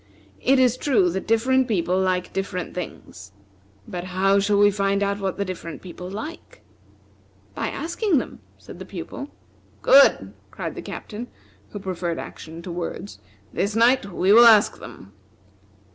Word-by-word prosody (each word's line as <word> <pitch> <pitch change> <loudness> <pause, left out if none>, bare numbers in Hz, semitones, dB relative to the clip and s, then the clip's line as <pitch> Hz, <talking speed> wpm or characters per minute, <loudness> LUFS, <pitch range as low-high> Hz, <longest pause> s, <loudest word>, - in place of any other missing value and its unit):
It 270 +1 +3
is 255 -1 +3
true 210 -13 +2
that 190 +2 -4
different 255 +3 +2
people 180 -5 0
like 185 -1 -1
different 195 -2 -4
things. 135 - -8 0.5
But 175 0 -5
how 195 +2 +2
shall 200 +1 +1
we 205 0 +5
find 200 0 0
out 200 0 -1
what 195 -2 -3
the 200 - -1
different 180 -3 -7
people 180 0 -8
like?" 295 - -8 0.9
"By - - -3
asking 340 +1 -1
them," - - -4 0.2
said - - -13
the - - -8
Pupil. 280 - -7 0.5
"Good!" - - +5 0.2
cried - - -6
the - - -7
Captain, 230 +3 -7 0.4
who - - -8
preferred 185 -4 -3
action 165 +1 -9
to 180 - -6
words. 175 +3 -6 0.3
"This 205 +2 -1
night 235 -2 +3
we 185 +3 +3
will 235 +2 +9
ask 215 -2 +5
them." 100 +1 -12
200 Hz, 155 wpm, -23 LUFS, 180-235 Hz, 0.9 s, will